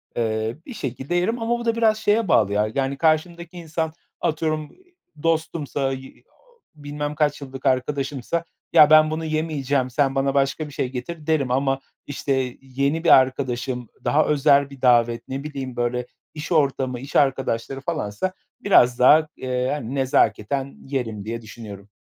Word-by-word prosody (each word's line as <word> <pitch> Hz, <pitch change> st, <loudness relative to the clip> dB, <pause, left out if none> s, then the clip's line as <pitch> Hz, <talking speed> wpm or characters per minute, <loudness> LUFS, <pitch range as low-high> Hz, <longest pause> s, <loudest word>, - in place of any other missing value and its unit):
eee, 110 Hz, 0 st, -1 dB
bir 255 Hz, -, -8 dB
şekilde 135 Hz, -, -4 dB
yerim. 225 Hz, +7 st, 0 dB
Ama 235 Hz, +1 st, 0 dB
bu 235 Hz, -, -6 dB
da 230 Hz, -, +1 dB
biraz 220 Hz, -2 st, +3 dB
şeye 215 Hz, 0 st, +1 dB
bağlı 105 Hz, -, +3 dB
ya: 105 Hz, +1 st, +2 dB
Yani 135 Hz, 0 st, -1 dB
karşımdaki 170 Hz, +3 st, 0 dB
insan 160 Hz, -1 st, -3 dB, 0.3 s
atıyorum, 155 Hz, -1 st, -1 dB
iii, 360 Hz, -1 st, -27 dB, 0.3 s
dostumsa 155 Hz, -4 st, -1 dB
y 135 Hz, 0 st, -6 dB, 0.2 s
ooo, 485 Hz, -1 st, -31 dB, 0.2 s
bilmem 145 Hz, 0 st, -5 dB
kaç 150 Hz, -1 st, 0 dB
yıllık 135 Hz, -1 st, -9 dB
arkadaşımsa, 140 Hz, +4 st, -1 dB, 0.3 s
"Ya, 150 Hz, -, +8 dB
ben 155 Hz, 0 st, +6 dB
bunu 160 Hz, +1 st, -3 dB
yemeyeceğim, 145 Hz, -4 st, -1 dB
sen 135 Hz, +1 st, +1 dB
bana 135 Hz, 0 st, +1 dB
başka 140 Hz, +2 st, 0 dB
bir 145 Hz, -, -12 dB
şey 130 Hz, -, -2 dB
getir." 150 Hz, +5 st, -7 dB
derim. 145 Hz, -6 st, +1 dB
Ama, 135 Hz, +1 st, +1 dB, 0.3 s
işte, 135 Hz, -3 st, -2 dB
yeni 140 Hz, +4 st, -1 dB
bir 170 Hz, -, +3 dB
arkadaşım, 130 Hz, -2 st, +2 dB
daha 155 Hz, -, +3 dB
özel 140 Hz, -1 st, +3 dB
bir 140 Hz, -2 st, -13 dB
davet, 120 Hz, -2 st, +3 dB
ne 135 Hz, +2 st, -5 dB
bileyim, 135 Hz, -4 st, -6 dB
böyle, 120 Hz, 0 st, -1 dB, 0.3 s
iş 155 Hz, +3 st, -7 dB
ortamı, 135 Hz, -5 st, +1 dB
iş 135 Hz, +3 st, -10 dB
arkadaşları 135 Hz, -1 st, +1 dB
falansa 160 Hz, -, -3 dB, 0.3 s
biraz 125 Hz, -11 st, +4 dB
daha, 155 Hz, +5 st, +6 dB
eee, 125 Hz, -1 st, -2 dB
hani, 140 Hz, -2 st, -4 dB
nezaketen 130 Hz, +1 st, 0 dB
yerim, 115 Hz, -7 st, -3 dB
diye 115 Hz, +1 st, -4 dB
düşünüyorum. 105 Hz, -3 st, -10 dB
140 Hz, 160 wpm, -23 LUFS, 125-155 Hz, 0.3 s, Ya